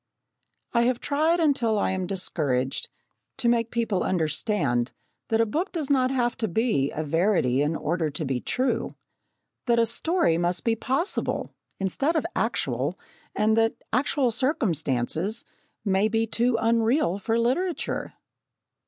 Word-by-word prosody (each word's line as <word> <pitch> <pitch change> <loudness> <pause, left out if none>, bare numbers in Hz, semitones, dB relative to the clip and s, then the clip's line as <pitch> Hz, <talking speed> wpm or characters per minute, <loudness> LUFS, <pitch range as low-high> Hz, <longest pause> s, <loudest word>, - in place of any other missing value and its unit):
I 235 - +4
have 245 -1 +1
tried, 315 +4 +1
until 260 -9 +2
I 200 - +1
am 185 -1 -2
discouraged, 145 -9 -1 0.5
to 240 - 0
make 235 -1 +2
people 230 -6 0
understand 155 - 0 0.3
that 225 - +1
a - - +4
book 320 - -2
does 305 -5 -2
not 255 -2 +3
have 245 -2 0
to 225 - -1
be 205 - +1
a 155 - -1
verity 160 -5 +2
in 150 +3 +1
order 160 0 -1
to 150 +2 -4
be 130 -2 -1
true 260 +1 -1 0.8
that 235 -1 +3
a 230 - +4
story 230 - +1
must 175 +1 0
be 230 -1 +2
possible, 270 - -1 0.2
instead 270 - 0
of 315 - +1
actual, - - -1 0.4
and 215 +1 +3
that 225 0 +3 0.2
actual 255 0 +2
circumstances 195 - -1 0.4
may 195 +1 +3
be 225 +1 +1
too 235 +2 +1
unreal 230 - +2
for 225 +3 0
literature. 285 +10 -1
225 Hz, 145 wpm, -26 LUFS, 170-250 Hz, 0.8 s, I